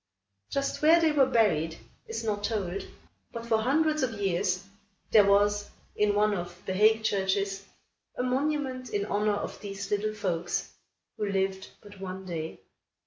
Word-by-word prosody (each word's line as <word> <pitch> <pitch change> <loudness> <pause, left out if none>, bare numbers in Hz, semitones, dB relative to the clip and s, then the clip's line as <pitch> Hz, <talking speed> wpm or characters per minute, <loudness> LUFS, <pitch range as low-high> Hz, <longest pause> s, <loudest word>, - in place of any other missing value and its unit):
Just 275 0 -2
where 320 +3 +7
they 325 -2 +3
were 280 -3 +4
buried 165 -10 +2 0.3
is 225 0 -4
not 205 -2 -2
told, 200 -4 -2 0.4
but, 230 0 -6
for 225 -1 +2
hundreds 305 +6 +2
of 235 -5 -1
years, 185 -1 0 0.5
there 205 -3 +6
was, 205 +1 +3 0.3
in 210 -1 +2
one 210 0 +3
of 175 -2 -5
The 190 - -2
Hague 220 +3 +4
churches, 195 -1 0 0.5
a 250 - 0
monument 260 -1 -1
in 200 -1 -1
honor 210 0 +1
of - - -5
these 195 -2 -6
little 215 +1 0
folks, 175 -4 -2 0.5
who 210 -1 -1
lived 190 -1 -1 0.2
but 205 -1 -13
a 190 0 -5
day. 165 -3 -5
205 Hz, 155 wpm, -28 LUFS, 190-230 Hz, 0.5 s, where